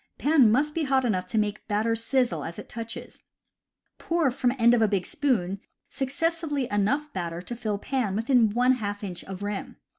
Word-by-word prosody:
Pan 285 -7 +5
must 295 +6 +2
be 325 -1 -1
hot 265 -1 +2
enough 185 -6 0
to 200 - -2
make 210 -1 -1
batter 220 +2 +1
sizzle 230 - 0
as 170 - -6
it - - -8
touches. 230 0 -7 0.8
Pour 330 -5 +1
from 245 0 +1
end 235 0 +5
of 240 - +3
a 220 - +5
big 195 -3 0
spoon 235 - 0 0.3
successively 295 0 -1
enough 275 +9 0
batter 170 -2 -3
to 240 - -6
fill 215 -3 -2
pan 225 -3 -1
within 230 0 +3
one 245 +4 +3
half 205 -5 -2
inch 180 -3 -5
of 190 +1 -7
rim. 205 -1 -4
230 Hz, 185 wpm, -26 LUFS, 205-270 Hz, 0.8 s, Pan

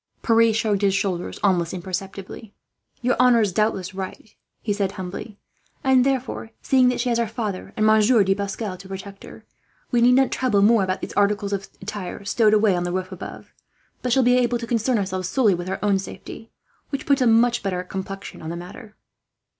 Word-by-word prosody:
Pierre 230 -1 +4
shrugged 215 -2 0
his 195 -1 +2
shoulders 185 -3 -2
almost 180 -3 +1
imperceptibly. 195 +3 -6 0.5
"Your 250 0 +2
honour 250 -2 +5
is 205 -4 0
doubtless 195 -3 0
right," 190 +3 -7 0.3
he 210 - -2
said 200 -1 -1
humbly; 195 +2 -7 0.5
"and 265 -2 +4
therefore, 260 -4 -2
seeing 255 -2 +4
that 250 - -1
she 245 +1 0
has 235 -1 +1
her 235 - +1
father 215 -4 -4
and 215 - +2
Monsieur 215 +1 +5
de 195 0 +2
Pascal 200 0 -4
to 190 - -12
protect 195 +1 -8
her, - - -13 0.5
we 240 -2 +3
need 245 +1 +6
not 265 +1 +3
trouble 215 -6 +2
more 220 -1 +5
about 185 0 -2
those - - -5
articles 205 0 +1
of 195 0 -4
attire 200 -1 -6
stowed 215 +1 +3
away 210 -3 +3
on 175 - -1
the 175 - -2
roof 185 0 -3
above; - - -9 0.5
but 250 - -2
shall 265 +1 +4
be 245 +1 +4
able 240 -1 +1
to 235 - -6
concern 235 +1 +1
ourselves 185 -2 -2
solely 225 -3 +3
with 175 +1 -4
our 190 - -2
own 200 -2 +2
safety, 225 +3 -9 0.4
which 275 - -4
puts 280 -1 +2
a 250 - +4
much 235 +1 +4
better 185 -3 -2
complexion 195 +1 -7
on 160 - -6
the 170 - -4
affair." 215 +3 -12
205 Hz, 200 wpm, -23 LUFS, 190-235 Hz, 0.5 s, need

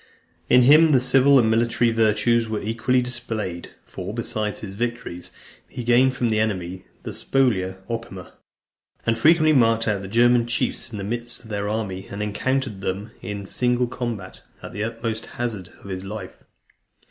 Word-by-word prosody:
In 125 0 +6
him 155 +4 +7
the 130 - +6
civil 135 +2 +5
and 120 -4 +4
military 115 +1 +2
virtues 115 +1 +2
were 110 -1 -1
equally 115 +4 +1
displayed; 110 -8 -4 0.2
for, - - -7
besides 105 -1 -3
his 95 -3 -7
victories, 115 -5 -4 0.4
he 125 - -6
gained 125 +2 +4
from 120 -2 0
the 110 - +2
enemy 95 -4 -2 0.2
the - - -5
Spolia 95 -9 +1
Opima, 115 -5 -6 0.7
and 115 - +2
frequently 155 +5 +5
marked 115 -4 +3
out 105 -3 0
the 95 - -7
German 120 +2 +4
chiefs 120 +1 -1
in 110 - -6
the 100 - -4
midst 120 +3 -4
of 110 - -14
their 100 0 -2
army, 100 -3 -3
and 100 +1 -4
encountered 110 0 -1
them 100 +4 -3
in 100 +1 -5
single 125 +3 +1
combat, 120 -6 -5 0.2
at - - -8
the 105 - -3
utmost 115 0 -4
hazard 110 -7 -3
of 100 - -10
his 95 0 -4
life. 105 +3 -7
115 Hz, 170 wpm, -23 LUFS, 105-120 Hz, 0.7 s, him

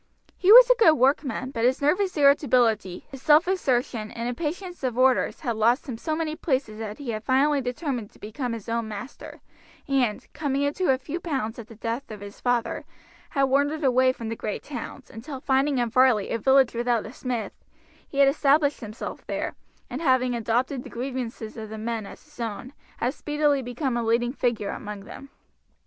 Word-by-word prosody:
He 375 - +3
was - - +11
a - - +5
good 375 -9 +7
workman, 260 -1 +1
but 230 -3 -3
his 255 +2 +3
nervous 365 +6 +1
irritability, 245 - +3
his 270 -2 -9
self 305 +3 +5
assertion, 250 - 0
and 230 +1 -5
impatience 340 +7 -4
of 250 -2 -1
orders 255 0 +2
had 240 -7 -2
lost 235 +6 +2
him 250 - -4
so 310 +7 -3
many 310 -1 -2
places 260 -9 -2
that 215 -1 -5
he 275 -5 -5
had 215 -1 -4
finally 275 +3 +2
determined 250 -3 -3
to - - -22
become 230 +3 -4
his 225 -2 -7
own 230 -1 -1
master, 220 +5 -8 0.5
and, 255 -6 0
coming 280 -2 -1
into 295 +6 0
a 260 - +2
few 290 +6 -5
pounds 265 -10 -3
at 225 - -9
the 230 - -13
death 230 +5 -4
of 215 -2 -8
his 205 0 -11
father, 245 -1 0 0.5
had 275 - +1
wandered 285 +3 +1
away 255 -1 +4
from 230 -3 -7
the 225 - -3
great 215 -1 -4
towns, 255 -6 -8
until 265 +4 -7
finding 270 +1 +1
in 240 -2 0
Varley 250 -5 +3
a 230 - -1
village 265 +1 +4
without 235 -1 0
a 220 - -9
smith, 250 -4 -4 0.5
he 275 - -9
had 280 0 +6
established 285 +1 +3
himself 215 -2 -7
there, - - -3 0.3
and 260 +4 -6
having 255 -4 +2
adopted 240 +4 -1
the - - -10
grievances 240 -3 -5
of 220 -1 -7
the 220 - -7
men 220 -1 -3
as - - -12
his 300 -3 -22
own, 230 +3 -5 0.2
had 245 +3 -1
speedily 295 -2 0
become 250 +1 -2
a 240 - 0
leading 235 +2 +1
figure 230 -7 -1
among 210 -1 -7
them. 275 +7 -11
255 Hz, 195 wpm, -25 LUFS, 230-285 Hz, 0.5 s, was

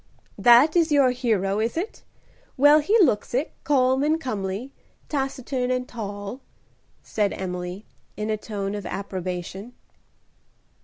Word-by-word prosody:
"That 245 +7 +6
is 335 -2 +3
your 280 -3 +5
hero, 215 -5 0
is 225 +7 -1
it? 380 +7 -4 0.6
Well, 290 +3 +7
he 400 +10 +3
looks 245 - +2
it, 275 +5 0
calm 260 -2 +2
and 310 +2 +2
comely, 215 -1 -4 0.4
taciturn 265 -2 -2
and 250 0 -1
tall," 205 +1 -6 0.6
said 205 -2 -1
Emily, 180 +1 -5 0.3
in 215 +1 -2
a - - +1
tone 205 -2 -4
of 205 -3 -5
approbation. 190 +3 -5
235 Hz, 125 wpm, -24 LUFS, 200-270 Hz, 0.6 s, Well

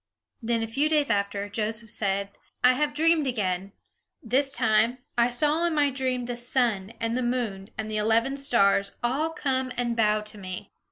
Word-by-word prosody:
Then, 230 0 0
a - - -3
few 275 +7 +1
days 300 -5 +2
after, 200 -1 -1
Joseph 220 +1 -3
said, 200 -1 -1 0.3
"I 250 0 +7
have 290 +2 -1
dreamed 320 -1 +3
again. 195 -5 -2 0.5
This 270 +4 +1
time, 230 0 +2 0.2
I 235 0 +3
saw 300 +7 +1
in 335 - -1
my 290 -2 +3
dream 255 -2 -1
the 240 0 -4
sun, 235 -5 0
and 230 0 -1
the 255 - 0
moon, 235 -6 -2
and 215 0 -4
eleven 225 +5 +1
stars, 200 -7 +2
all 275 +7 0
come 260 -5 -2
and 240 -1 0
bow 215 -2 +2
to 210 0 -7
me!" 185 -1 -7
235 Hz, 175 wpm, -26 LUFS, 210-265 Hz, 0.5 s, I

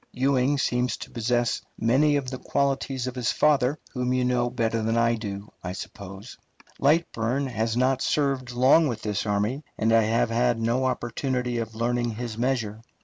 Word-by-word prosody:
Ewing 135 +1 +2
seems 125 -2 0
to - - -9
possess 120 +1 0 0.2
many 135 +6 +3
of 135 -2 -2
the 130 - -5
qualities 135 -2 -1
of 130 - -3
his 125 -2 0
father, 145 -2 +2 0.2
whom 125 -1 -1
you 130 0 +1
know 125 -1 +1
better 115 -1 -1
than 115 +1 0
I 115 0 +3
do, 105 -2 -5
I 90 0 -4
suppose. 100 +3 -9 0.4
Lightburne 140 -4 +1
has 115 -2 -1
not 130 +1 +2
served 135 -4 0
long 130 +6 +5
with 115 -5 -4
this 105 0 -2
army, 105 +8 0
and 110 +1 +2
I 115 - +6
have 115 +1 +1
had 120 0 +2
no 120 +3 +1
opportunity 125 0 -1
of 110 -1 -5
learning 120 0 -1
his 120 -1 -5
measure. 115 -3 -1
120 Hz, 175 wpm, -26 LUFS, 115-130 Hz, 0.4 s, I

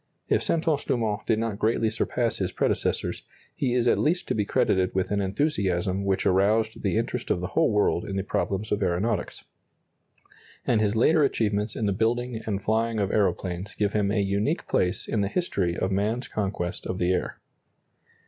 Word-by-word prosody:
If - - +3
Santos 160 -3 +1
Dumont 110 -3 -1
did 110 - +3
not 110 -2 -2
greatly 110 0 +1
surpass 115 +1 -1
his 95 -2 -1
predecessors, - - -1 0.3
he 125 -3 0
is 125 -1 +2
at - - +3
least 170 +4 +1
to - - +2
be 105 -2 0
credited 95 -2 +1
with 95 0 0
an 100 0 +1
enthusiasm 95 - 0
which 95 -1 0
aroused 105 +4 +2
the - - 0
interest - - -2
of - - +1
the 90 - -4
whole 165 - +2
world 105 -4 +1
in 95 - -4
the 95 - -1
problems 100 +1 -2
of 105 - 0
aeronautics; 95 +3 -1 1.2
and 110 -3 +2
his 105 0 +1
later 155 +8 +4
achievements 105 -5 0
in 110 - -1
the 100 - +1
building 115 +2 -1
and 100 -2 -2
flying 110 +1 +1
of 100 -1 0
aeroplanes 95 -2 -1
give 105 -1 0
him 105 -2 +1
a 105 - +1
unique 100 +1 0
place 90 +2 0
in 110 - 0
the 100 - +1
history 95 - -1
of 95 - -1
man's 110 +5 0
conquest 95 -4 -3
of 90 - -3
the 90 0 +1
air. 90 - -3
105 Hz, 185 wpm, -26 LUFS, 95-115 Hz, 1.2 s, later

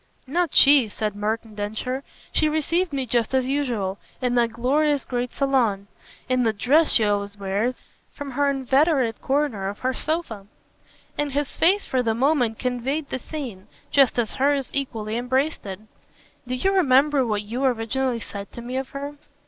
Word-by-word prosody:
"Not 335 +4 -1
she," 275 -5 +7
said 210 -1 -3
Merton 215 +2 -3
Densher. 220 +6 -3 0.3
"She 310 - +2
received 330 +3 0
me 270 -2 -2
just 240 +1 0
as 260 -1 +2
usual: 240 -9 -1 0.2
in 250 -1 0
that 235 -1 +2
glorious 285 +4 +1
great 245 -1 -2
salone, 245 -8 +1 0.4
in 255 0 +2
the 225 -2 +2
dress 285 +10 +3
she 225 - +4
always 205 0 -1
wears, 200 +5 -1 0.3
from 285 -1 -7
her 285 +2 +1
inveterate 270 -2 +2
corner 265 -8 0
of 205 - -8
her 260 0 0
sofa." 255 -11 -3 0.7
And 290 -2 -1
his 290 0 -1
face 385 +5 +3
for 255 - 0
the 225 -2 0
moment 250 -3 +2
conveyed 265 +4 -2
the 260 - -2
scene, 245 -10 -7 0.2
just 275 -4 +4
as 235 -3 0
hers 275 0 +1
equally 225 -5 -2
embraced 260 +2 -1
it. 190 -1 -5 0.7
"Do 255 - -2
you 380 +10 +1
remember 285 -5 +4
what 210 -3 -1
you 235 +6 -4
originally 250 0 0
said 200 -2 -7
to 235 - -7
me 250 +2 -4
of 265 0 -3
her?" 285 +1 -5
255 Hz, 170 wpm, -24 LUFS, 225-280 Hz, 0.7 s, she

